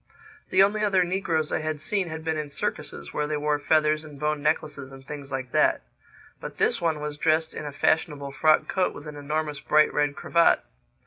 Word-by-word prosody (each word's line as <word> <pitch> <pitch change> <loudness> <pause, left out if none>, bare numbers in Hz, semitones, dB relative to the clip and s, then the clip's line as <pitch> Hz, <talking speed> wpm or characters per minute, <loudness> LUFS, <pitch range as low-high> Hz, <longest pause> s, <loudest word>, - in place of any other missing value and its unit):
The 190 +1 +6
only 210 +2 +1
other 195 -3 +3
negroes 170 -4 -1
I - - 0
had 155 -1 -3
seen 190 +4 -1
had 160 0 -6
been 160 0 -1
in 150 -1 -4
circuses, 70 - -5
where 150 0 -1
they 150 0 -1
wore 150 0 0
feathers 155 0 +2
and 150 -3 -12
bone 150 0 -1
necklaces 150 -3 -1
and 135 0 -13
things 140 -1 -8
like 130 -2 -4
that. - - +3 0.6
But - - -8
this - - +1
one 160 -3 0
was 150 0 -5
dressed 160 +1 +2
in - - -6
a - - -5
fashionable 145 -1 0
frock 155 +2 +3
coat 185 -1 0
with 145 - -10
an 150 -1 -8
enormous 150 0 -3
bright 155 0 +3
red 145 -1 +1
cravat. 170 - +3
150 Hz, 205 wpm, -26 LUFS, 145-160 Hz, 0.6 s, The